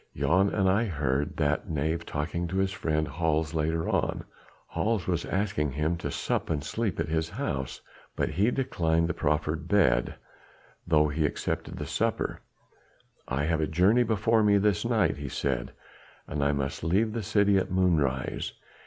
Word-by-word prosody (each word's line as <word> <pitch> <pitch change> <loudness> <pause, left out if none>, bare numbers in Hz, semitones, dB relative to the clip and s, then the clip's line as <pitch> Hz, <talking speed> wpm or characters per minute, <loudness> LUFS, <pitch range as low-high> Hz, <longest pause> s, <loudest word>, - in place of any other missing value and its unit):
"Jan 95 +4 +3
and 95 -2 +1
I 100 +5 +3
heard 75 - -1
that 75 -1 0
knave 80 +2 -1
talking 85 +4 -2
to 95 +3 -3
his 95 0 +1
friend 80 -4 -1
Hals 80 -1 0
later 80 +1 0
on. - - 0 0.5
Hals 110 -5 0
was 85 -2 -1
asking 95 -8 -1
him 75 +4 0
to 75 -4 -4
sup - - -2
and 75 -3 -1
sleep 110 +5 -2
at - - 0
his 80 +1 -1
house. 75 - -4 0.3
But - - 0
he 100 +9 +2
declined 85 -11 +1
the 90 - -1
proffered 75 +1 -1
bed, 90 -11 +3 0.7
though 75 -2 +4
he 75 +2 -1
accepted - - -4
the - - -4
supper: - - -1 0.9
'I 70 +2 -1
have 80 +1 +1
a 75 - +1
journey 95 +10 +4
before 110 0 +2
me 105 -1 +4
this 100 -2 +2
night,' - - +2
he 70 -1 -5
said, 65 -2 -2 0.6
'and 80 - -4 0.2
must 70 +2 -3
leave 100 +7 +1
the 115 - -2
city 100 -1 +3
at 95 - -3
moonrise.' 80 -9 0
80 Hz, 165 wpm, -28 LUFS, 75-100 Hz, 0.9 s, though